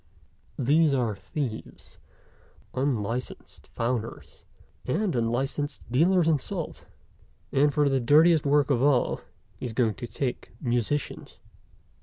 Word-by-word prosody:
These 145 Hz, +3 st, +3 dB
are 120 Hz, -5 st, 0 dB
thieves, 120 Hz, +2 st, -6 dB, 0.7 s
unlicensed 125 Hz, -3 st, -3 dB
founders, 115 Hz, -1 st, -3 dB, 0.4 s
and 180 Hz, +5 st, 0 dB
unlicensed 130 Hz, +5 st, -1 dB
dealers 170 Hz, +6 st, +4 dB
in 155 Hz, -3 st, +3 dB
salt, 170 Hz, +3 st, -6 dB, 0.6 s
and, 145 Hz, +2 st, +3 dB
for 145 Hz, 0 st, +2 dB
the 135 Hz, -1 st, +2 dB
dirtiest 155 Hz, +6 st, +5 dB
work 145 Hz, 0 st, +3 dB
of 125 Hz, -3 st, +2 dB
all, 140 Hz, -3 st, +2 dB, 0.4 s
he -, -, -3 dB
is 115 Hz, -, -6 dB
going 115 Hz, -2 st, +2 dB
to 120 Hz, +1 st, -7 dB
take 125 Hz, +1 st, -4 dB
musicians." 125 Hz, +3 st, -2 dB
135 Hz, 115 wpm, -27 LUFS, 120-150 Hz, 0.7 s, dirtiest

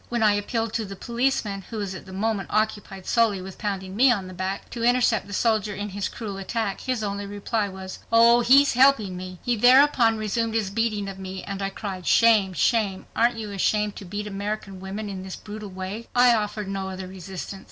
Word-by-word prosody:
When 235 Hz, -2 st, 0 dB
I 210 Hz, -1 st, +5 dB
appealed 225 Hz, +2 st, -2 dB
to 230 Hz, -, -1 dB
the 195 Hz, -1 st, -7 dB
policeman, 235 Hz, -4 st, -1 dB
who 230 Hz, -, -5 dB
was 200 Hz, -3 st, -3 dB
at 190 Hz, -, -9 dB
the -, -, -10 dB
moment 200 Hz, 0 st, -2 dB
occupied 210 Hz, -3 st, -1 dB
solely 225 Hz, -4 st, +2 dB
with 185 Hz, 0 st, -9 dB
pounding 190 Hz, -2 st, -4 dB
me 255 Hz, +4 st, +6 dB
on 200 Hz, -5 st, 0 dB
the 185 Hz, -, -9 dB
back, 190 Hz, +2 st, -4 dB
to 235 Hz, -, -5 dB
intercept 240 Hz, -3 st, +2 dB
the -, -, -10 dB
soldier 215 Hz, -1 st, +1 dB
in 205 Hz, +1 st, -4 dB
his 200 Hz, +1 st, -3 dB
cruel 205 Hz, -4 st, -6 dB
attack, 200 Hz, +1 st, -3 dB
his 255 Hz, -4 st, -2 dB
only 200 Hz, 0 st, -3 dB
reply 205 Hz, +1 st, -2 dB
was: 190 Hz, 0 st, -8 dB
"Oh, 230 Hz, +1 st, +6 dB
he's 275 Hz, +4 st, +6 dB
helping 245 Hz, -7 st, +4 dB
me." 185 Hz, 0 st, -7 dB
He 245 Hz, -, +1 dB
thereupon 245 Hz, -1 st, +5 dB
resumed 225 Hz, +1 st, -1 dB
his 210 Hz, -4 st, 0 dB
beating 215 Hz, -2 st, -1 dB
of 195 Hz, -1 st, -7 dB
me 190 Hz, 0 st, -6 dB
and 200 Hz, 0 st, -5 dB
I 195 Hz, -, -1 dB
cried, 195 Hz, -2 st, -6 dB
"Shame, 215 Hz, -5 st, +5 dB
shame! 195 Hz, -, +1 dB
Aren't 235 Hz, +1 st, +2 dB
you 215 Hz, -2 st, -5 dB
ashamed 210 Hz, +1 st, 0 dB
to 200 Hz, -, -8 dB
beat 205 Hz, +3 st, -5 dB
American 200 Hz, -1 st, -4 dB
women 195 Hz, +3 st, -5 dB
in 195 Hz, -2 st, -5 dB
this 190 Hz, 0 st, -7 dB
brutal 210 Hz, -1 st, -8 dB
way?" 190 Hz, +4 st, -6 dB
I 245 Hz, 0 st, +6 dB
offered 210 Hz, -2 st, -2 dB
no 195 Hz, -1 st, -3 dB
other 190 Hz, 0 st, -6 dB
resistance. 190 Hz, +1 st, -7 dB
205 Hz, 215 wpm, -25 LUFS, 195-230 Hz, -, me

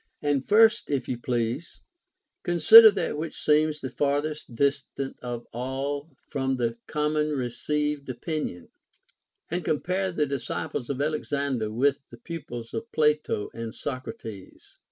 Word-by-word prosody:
5. 145 Hz, -, +2 dB
And 140 Hz, -2 st, +1 dB
first, 220 Hz, +2 st, +5 dB
if 135 Hz, -4 st, -1 dB
you 125 Hz, -, -3 dB
please, 120 Hz, +5 st, -2 dB, 0.6 s
consider 220 Hz, +7 st, +9 dB
that 195 Hz, -7 st, -2 dB
which 160 Hz, 0 st, -5 dB
seems 155 Hz, 0 st, +2 dB
the 130 Hz, -, -5 dB
farthest 145 Hz, -1 st, -1 dB
distant 140 Hz, 0 st, -1 dB
of 120 Hz, -1 st, -5 dB
all 135 Hz, +5 st, -3 dB, 0.2 s
from 135 Hz, -2 st, -1 dB
the 115 Hz, -1 st, -1 dB
common 150 Hz, 0 st, 0 dB
received 145 Hz, +3 st, -2 dB
opinion, 130 Hz, -, -4 dB, 0.8 s
and 175 Hz, +1 st, -1 dB
compare 185 Hz, +6 st, 0 dB
the 155 Hz, -4 st, +1 dB
disciples 135 Hz, -2 st, -4 dB
of 140 Hz, -2 st, -2 dB
x\lexander 140 Hz, -6 st, -1 dB
with 140 Hz, +5 st, +2 dB
the 120 Hz, -, -12 dB
pupils 120 Hz, -5 st, -7 dB
of 230 Hz, +1 st, -5 dB
Plato 150 Hz, -8 st, +1 dB
and 115 Hz, -1 st, -6 dB
Socrates. 115 Hz, -7 st, -8 dB
140 Hz, 135 wpm, -26 LUFS, 125-155 Hz, 0.8 s, consider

